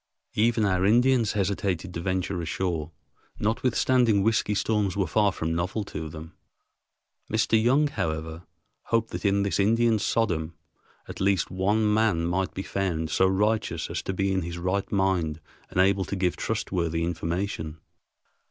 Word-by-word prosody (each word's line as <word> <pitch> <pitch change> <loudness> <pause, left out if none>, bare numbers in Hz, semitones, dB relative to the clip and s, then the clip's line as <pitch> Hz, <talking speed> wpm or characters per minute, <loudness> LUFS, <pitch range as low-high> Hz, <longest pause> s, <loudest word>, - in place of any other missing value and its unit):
Even 110 0 +2
our 95 -2 +1
Indians 120 +2 +3
hesitated 95 -3 -1
to 85 - -4
venture 95 0 -1
ashore, 85 -1 -2 0.5
notwithstanding 115 -1 +2
whiskey 110 -1 +1
storms 100 -3 0
were 100 - +2
far 105 +4 +2
from 80 -2 -3
novel 90 +6 -2
to 80 -4 -6
them. 80 0 -10 1.0
Mr. 110 -1 +2
Young, 135 +6 +4
however, 80 - -3 0.4
hoped 115 -1 0
that - - -5
in 100 0 +3
this 100 -3 -1
Indian 115 +2 +3
Sodom 85 -8 0 0.5
at - - -8
least 95 -2 +1
one 105 +3 +1
man 105 -6 +2
might 95 +2 -1
be 95 - -3
found 85 -6 -2
so 95 - +3
righteous 105 +3 0
as - - -2
to - - -3
be 95 +1 0
in 95 - +1
his 85 0 -5
right 95 +3 -2
mind 95 -6 0 0.3
and - - -2
able 95 0 +3
to - - -4
give 90 -2 0
trustworthy 85 -7 -2
information. 85 -1 -3
95 Hz, 150 wpm, -26 LUFS, 85-105 Hz, 1.0 s, Young